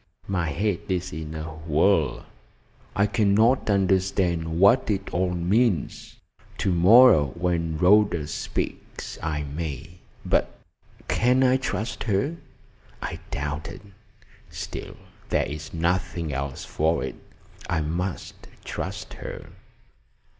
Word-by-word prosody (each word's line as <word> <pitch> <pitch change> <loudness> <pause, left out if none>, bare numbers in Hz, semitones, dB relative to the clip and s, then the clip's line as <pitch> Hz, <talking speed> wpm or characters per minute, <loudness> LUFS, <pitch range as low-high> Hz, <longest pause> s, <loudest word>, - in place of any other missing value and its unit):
My 90 -5 -1
head 95 +5 0
is 90 -2 -2
in 80 0 -6
a 80 - -4
whirl. 80 -1 +1 0.7
I 100 - +3
cannot 110 +5 +3
understand 95 -4 +1
what 110 +7 +5
it 100 -2 -1
all 90 +1 +1
means. 95 - 0 0.4
To 95 - 0
morrow, 90 - +7
when 85 -2 -1
Rhoda 90 -2 +4
speaks, - - -5
I 75 -2 -2
may. 75 +2 -6 0.3
But - - +1 0.5
can 125 +3 +3
I 130 0 +4
trust 110 -4 -3
her? 115 +10 0 0.6
I - - -5
doubt 75 +3 -3
it. - - -10 0.7
Still, - - -7 0.3
there - - +2
is 75 +1 -7
nothing 85 -1 -1
else 70 0 -4
for 80 +2 0
it. - - -5 0.5
I 80 -2 +1
must 85 +4 -4 0.2
trust - - -5
her." - - -8
90 Hz, 115 wpm, -25 LUFS, 80-100 Hz, 0.7 s, morrow